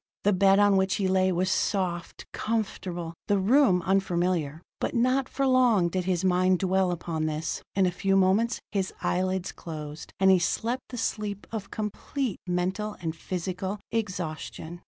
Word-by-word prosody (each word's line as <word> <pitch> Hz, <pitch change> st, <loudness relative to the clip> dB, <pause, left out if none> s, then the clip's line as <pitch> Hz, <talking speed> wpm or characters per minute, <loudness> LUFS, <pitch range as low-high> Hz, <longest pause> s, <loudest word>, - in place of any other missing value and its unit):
The 205 Hz, -, +4 dB
bed 195 Hz, +1 st, +5 dB
on 205 Hz, -1 st, +5 dB
which 190 Hz, 0 st, +2 dB
he 195 Hz, -, 0 dB
lay 185 Hz, 0 st, +3 dB
was 185 Hz, +1 st, 0 dB
soft, 185 Hz, -2 st, -1 dB
comfortable; 185 Hz, -6 st, -3 dB
the 205 Hz, -1 st, +3 dB
room, 195 Hz, -2 st, +4 dB
unfamiliar. 175 Hz, -4 st, 0 dB, 0.2 s
But -, -, -2 dB
not 255 Hz, +2 st, +2 dB
for 275 Hz, -, -1 dB
long 245 Hz, -9 st, +4 dB
did 185 Hz, +1 st, -2 dB
his 185 Hz, -1 st, 0 dB
mind 185 Hz, 0 st, +3 dB
dwell 190 Hz, 0 st, +1 dB
upon 165 Hz, -2 st, -2 dB
this; 155 Hz, +1 st, -3 dB
in 195 Hz, -1 st, +4 dB
a 180 Hz, -, +2 dB
few 195 Hz, +2 st, +1 dB
moments 195 Hz, +5 st, +3 dB
his 195 Hz, -2 st, -1 dB
eyelids 185 Hz, 0 st, 0 dB
closed, 155 Hz, -2 st, -8 dB
and 190 Hz, 0 st, +6 dB
he 185 Hz, -, +5 dB
slept 235 Hz, +8 st, -1 dB
the 245 Hz, -, -6 dB
sleep 210 Hz, -3 st, -3 dB
of 215 Hz, -3 st, -5 dB
complete 215 Hz, +3 st, -3 dB
mental 185 Hz, +4 st, -1 dB
and 165 Hz, -2 st, -3 dB
physical 185 Hz, +3 st, -4 dB
exhaustion. 175 Hz, -5 st, -4 dB
190 Hz, 160 wpm, -27 LUFS, 175-205 Hz, 0.2 s, and